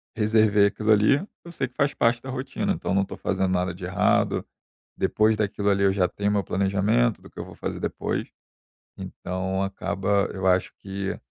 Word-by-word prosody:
reservei 110 -2 +4
aquilo 110 +2 0
ali, 105 +5 +5 0.3
eu 170 - -10
sei 135 -5 -2
que 125 - -23
faz 140 - +2
parte 120 +1 +2
da 130 - -8
rotina, 130 0 -2
então 90 - -2
não 100 - +3
estou 100 - -5
fazendo 95 -1 0
nada 90 0 0
de 90 - -11
errado. 90 0 +1 0.5
Depois 110 0 +2
daquilo 100 -1 0
ali, 100 0 +2
eu 100 - +4
já 95 -2 +2
tenho 100 +3 -2
o - - 0
meu 100 -1 +1
planejamento 95 - +1
do - - -14
que - - -28
eu - - -4
vou - - -12
fazer - - -5
depois. - - -3 0.7
Então 95 +1 -3
acaba 100 +1 0
eu 95 -1 -4
acho 90 0 +2
que 95 0 -4
100 Hz, 195 wpm, -25 LUFS, 95-110 Hz, 0.7 s, ali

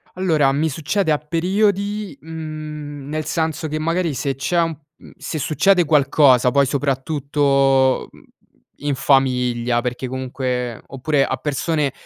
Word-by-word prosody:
Allora, 160 -7 +2
mi 155 +3 0
succede 160 +5 -1
a 150 - +3
periodi, 200 +4 -1
mhmm, 155 -3 -7
nel 155 0 -3
senso 160 0 -2
che 155 +1 -3
magari 165 0 0
se 135 0 -2
c'è 170 +6 0
un 165 -2 -2 0.4
se 160 - -5
succede 175 +5 +2
qualcosa 140 -4 +4
poi 140 +1 +3
soprattutto, 135 -1 +1
mhmm, - - -18 0.6
in 145 -1 -1
famiglia 125 -3 +1
perché 125 +1 -4
comunque 125 -2 -3
oppure 135 +1 0
a 130 - -1
persone 145 +1 -1
145 Hz, 130 wpm, -20 LUFS, 135-160 Hz, 0.6 s, qualcosa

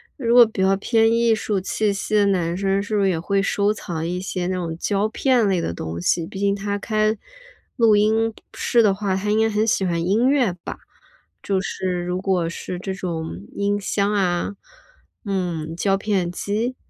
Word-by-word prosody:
如 235 -4 0
果 245 -1 +9
比 220 -3 -4
较 190 +1 +4
偏 225 +2 +2
艺 230 -1 +3
术 210 -2 -1
气 205 +2 0
息 200 +2 -2
的 205 -1 +4
男 175 -3 0
生， 195 0 +1
是 210 +1 -3
不 205 - +2
是 195 - +3
也 170 -3 0
会 195 +4 0
收 205 +1 +1
藏 165 -6 -4
一 180 +1 -2
些 185 -1 -3
那 185 - -1
种 170 -3 -4
胶 200 +3 0
片 245 -1 +2
类 190 -2 +1
的 125 - -2
东 80 0 -5
西。 165 - +1
毕 190 +2 -8
竟 200 0 +2
他 200 0 -2
开 215 +1 0 0.6
录 230 -4 +5
音 220 +2 +2 0.2
室 235 - +2
的 210 -3 +4
话， 195 -1 -1
他 205 +2 -2
应 215 - +2
该 225 - +3
很 215 +1 0
喜 195 -3 +2
欢 170 -2 0
音 220 +8 +3
乐 260 -9 +2
吧， - - -6 0.7
就 195 -1 0
是 185 -2 -3
如 180 +1 -2
果 185 -4 0
是 175 +1 -6
这 190 +1 -4
种 160 - -5
音 205 0 0
箱 200 +1 0
啊， 190 0 0 0.7
嗯， 175 -5 -2
胶 195 +3 +1
片 195 -4 -1
机？ 220 +7 -2
200 Hz, 215 characters per minute, -22 LUFS, 180-215 Hz, 0.7 s, 果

